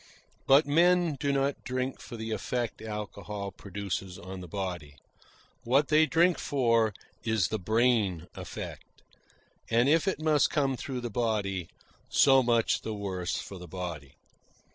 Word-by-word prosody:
But 140 +3 +6
men 170 +2 +3
do 140 - +1
not 140 0 0
drink 130 +1 -3
for 120 - -8
the 110 0 -5
effect 115 +2 -2
alcohol 105 -2 -5
produces 95 -2 -5
on 95 0 -8
the 90 - -8
body. 85 -5 -5 0.7
What 135 +5 +2
they 155 +1 +5
drink 170 +2 +3
for 115 -5 +2 0.3
is 110 -6 +1
the 110 - -2
brain 110 -4 +2
effect; - - -8 0.7
and 120 +3 +3
if 160 +5 +3
it 190 - 0
must 155 -2 +3
come 135 -3 +1
through 125 0 -5
the 120 -1 -4
body, 100 -6 -1 0.4
so 135 -1 +6
much 120 -2 +2
the 110 - -4
worse 95 -3 -3
for 95 - -7
the 90 - -9
body. 85 -6 -6
115 Hz, 145 wpm, -29 LUFS, 95-135 Hz, 0.7 s, But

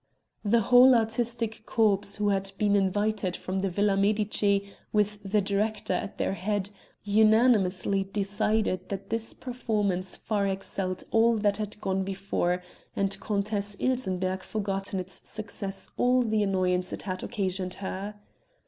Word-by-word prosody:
The 225 +2 +3
whole 250 +3 +7
artistic 230 0 -1
corps 205 -3 +2
who 210 0 0
had 195 -1 -1
been 205 -1 +2
invited 200 -1 0
from 190 +1 -3
the 195 0 0
Villa 200 +2 +2
Medici, 200 0 +1 0.2
with 210 -1 +1
the 205 +1 +1
director 205 +1 -1
at 180 - -3
their - - 0
head, 200 +1 -2 0.3
unanimously 205 -2 +3
decided 200 -1 0
that 195 0 -5
this 225 0 -1
performance 210 -7 -2
far 205 -2 -1
excelled 190 -1 -2
all 230 0 +4
that 205 -1 +1
had 210 -1 -5
gone 190 -1 0
before, 185 -2 -1 0.3
and 195 0 -1
Countess 205 -1 -2
Ilsenbergh 190 -7 0
forgot 195 -1 -3
in 190 - -1
its 185 +1 -5
success 200 -3 -4
all 250 0 +3
the 220 -2 +1
annoyance 185 -2 +1
it - - -5
had 185 -1 -4
occasioned 190 -4 -2
her. 195 +2 -5
200 Hz, 140 wpm, -28 LUFS, 190-215 Hz, 0.3 s, whole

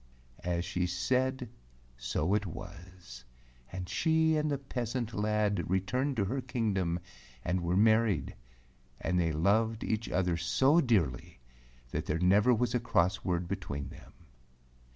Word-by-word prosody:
As 85 0 -1
she 90 +1 -1
said 130 +8 0 0.5
so 60 +9 -1
it 105 -1 +1
was, 90 -7 -10 0.5
and 90 -1 -5
she 160 - +2
and 150 0 +1
the 140 - 0
peasant 125 -3 -4
lad 105 -3 0
returned 125 +10 0
to 100 - +2
her 130 +7 -2
kingdom 100 -9 -1 0.5
and 90 +1 0
were 85 +2 0
married, 110 - +3 0.7
and 90 -1 0
they 85 -2 +1
loved 110 +8 +1
each 110 0 -2
other 90 -2 +1
so 135 - +3
dearly 85 - 0 0.5
that - - -3
there 75 - 0
never 100 +7 +4
was 120 0 +1
a 125 - +2
cross 95 -6 +1
word 90 -1 -1
between 80 -7 -4
them. - - -14
100 Hz, 140 wpm, -31 LUFS, 90-120 Hz, 0.7 s, never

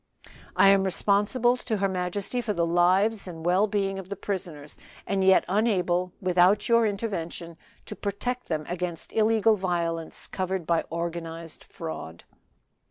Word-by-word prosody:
"I 195 - +6
am 195 -1 +5
responsible 210 +6 +2
to 225 -3 -2
her 195 0 +1
majesty 190 +6 -2
for 220 -3 -2
the 170 -3 +1
lives 185 +5 +2
and 165 -2 -8
well 185 +4 +3
being 195 -2 -1
of 190 -1 -10
the 200 - -3
prisoners, 175 -7 -5 0.3
and 195 -1 0
yet 190 0 +5
unable, 180 -3 +1
without 185 +2 +3
your 230 -1 +4
intervention, 175 -5 -4 0.3
to 210 - -7
protect 230 +6 -4
them 155 -2 -2
against 175 -1 -4
illegal 220 0 +3
violence 170 -3 -2
covered 190 -2 -3
by 170 0 +1
organized 165 -1 -5
fraud." 85 - -7
190 Hz, 145 wpm, -26 LUFS, 170-205 Hz, 0.3 s, I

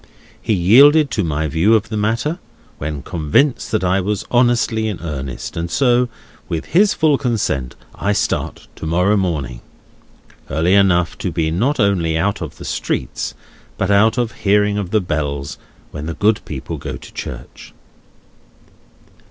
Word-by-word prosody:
He 110 - 0
yielded 140 - +6
to 105 - 0
my 80 -1 -1
view 85 +10 +3
of 110 0 0
the 110 - -4
matter, 115 - -1 0.4
when 70 -1 -4
convinced 90 - +1
that 110 - 0
I 95 +1 +2
was 105 +2 -2
honestly 120 -2 +2
in 105 -5 -4
earnest; 70 -6 -6
and 85 +1 -3
so, 125 +3 +2 0.4
with 80 -2 -3
his 200 +4 +3
full 155 -3 +2
consent, 100 - -1 0.2
I 100 - -1
start - - -2
to 80 - -6
morrow 90 +6 +2
morning. 75 -11 -2 0.9
Early 80 +6 +1
enough 90 -4 +3
to 90 - -2
be 80 -1 -1
not 125 - 0
only 90 -6 +2
out 100 +4 0
of - - -6
the - - -9
streets, - - -3 0.4
but 95 - 0
out 110 +4 +4
of 120 -2 0
hearing 105 -1 +1
of 95 -3 -4
the 110 +1 +2
bells, 75 -4 -3 0.3
when 75 +1 -6
the 85 - -4
good 105 +1 +2
people 75 +3 -6
go 70 -1 -6
to - - -14
church." - - -8
95 Hz, 160 wpm, -18 LUFS, 80-110 Hz, 0.9 s, yielded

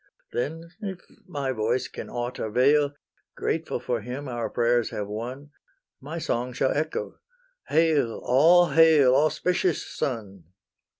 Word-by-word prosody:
Then, 165 +6 -3
if 190 -3 -5 0.3
my 140 -6 -2
voice 120 +1 0
can - - -8
aught 120 +1 -4
avail, 140 +6 +2 0.4
Grateful 160 -5 -2
for 120 -1 -2
him 125 +6 -6
our 120 -2 -3
prayers 120 0 +1
have 105 -1 -4
won, 125 +7 -6 0.5
My 150 +5 -7
song 125 -5 -2
shall 130 - +1
echo, 155 +2 -3 0.5
"Hail, 155 -7 +2
all 165 +8 +5
hail, 155 -6 +6
Auspicious 170 +4 +1
Sun!" 100 - -4
130 Hz, 125 wpm, -26 LUFS, 120-160 Hz, 0.5 s, hail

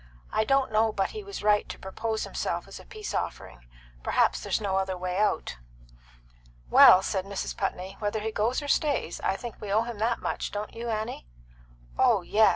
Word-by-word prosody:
"I 220 - +1
don't 270 -1 +2
know 220 +1 +3
but 195 -2 -1
he 430 - -6
was 400 0 -7
right 210 0 +3
to - - -6
propose 220 +3 -3
himself - - -3
as - - -9
a - - -14
peace 430 -1 -7
offering; 60 -1 -5 0.3
perhaps 60 0 +2
there's - - 0
no 195 -3 -1
other 190 -1 -1
way 180 0 -3
out." 205 - 0 1.1
"Well," 185 - +9
said 190 -2 -1
Mrs. 200 -1 -4
Putney, 190 +2 -3
"whether 210 +1 -1
he 220 +1 -2
goes 225 +7 0
or - - -5
stays, 285 - 0
I 190 - +1
think 235 +2 -8
we 205 - -5
owe 220 +3 +3
him 235 -3 -6
that 230 +2 +1
much. - - -3
Don't 210 +1 -5
you, 235 +1 -5
Annie?" 215 - -3 0.7
"Oh - - +4
yes!" 215 +1 +5
215 Hz, 195 wpm, -27 LUFS, 190-230 Hz, 1.1 s, Well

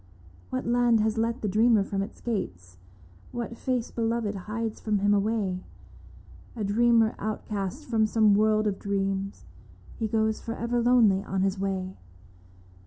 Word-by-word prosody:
What 130 - -3
land 240 -1 +3
has 220 +1 0
let 230 +2 -1
the - - +1
dreamer 215 +1 +4
from 195 0 -2
its 195 - -7
gates, 90 - -4 0.5
What 235 -1 -5
face 250 0 -2
beloved 230 -2 -1
hides 215 +3 -4
from 215 -2 0
him 205 +1 +2
away? 200 -3 0 0.9
A 220 - -3
dreamer 225 +2 +3
outcast 215 +4 -4
from 220 -3 +2
some 215 -1 +4
world 215 +1 +3
of 200 -2 -1
dreams 195 0 -2 0.3
— - - -21
He 225 - 0
goes 220 0 0
for 230 - -5
ever 240 0 -1
lonely 230 -5 +4
on 190 0 -1
his 195 0 0
way. 190 -1 -3
215 Hz, 155 wpm, -27 LUFS, 195-230 Hz, 0.9 s, dreamer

